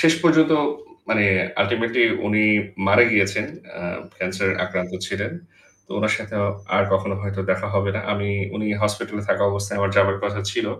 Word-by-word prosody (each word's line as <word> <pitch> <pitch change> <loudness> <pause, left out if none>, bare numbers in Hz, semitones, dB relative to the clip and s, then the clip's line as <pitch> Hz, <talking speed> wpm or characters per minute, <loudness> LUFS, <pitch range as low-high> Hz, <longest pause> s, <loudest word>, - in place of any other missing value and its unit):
শেষ 165 0 +5
পর্যন্ত 160 -2 +5 0.6
মানে 110 -2 +3 0.4
আল্টিমেটলি 115 +3 +1 0.2
উনি 105 0 +3 0.4
মারা 105 +5 +7
গিয়েছেন। 100 -2 +2 0.3
আ - - -8 0.4
ক্যান্সারে 95 +1 -1
আক্রান্ত 90 -1 -4
ছিলেন। 100 +5 -3 0.5
তো - - -27
উনার 110 +1 +2
সাথে 110 0 -8 0.4
আর 100 - +5
কখনো 95 +1 +1
হয়তো 100 -1 -4
দেখা 95 +3 -3
হবে 100 0 +1
না। - - -2
আমি 100 0 -2 0.3
উনি 105 +1 -3 0.2
হাসপাতালে 105 0 -2
থাকা - - +1
অবস্থায় 100 0 -3
আমার 100 0 +1
যাবার 100 0 +4
কথা 100 0 -2
ছিল। - - -1
100 Hz, 160 wpm, -22 LUFS, 100-110 Hz, 0.6 s, মারা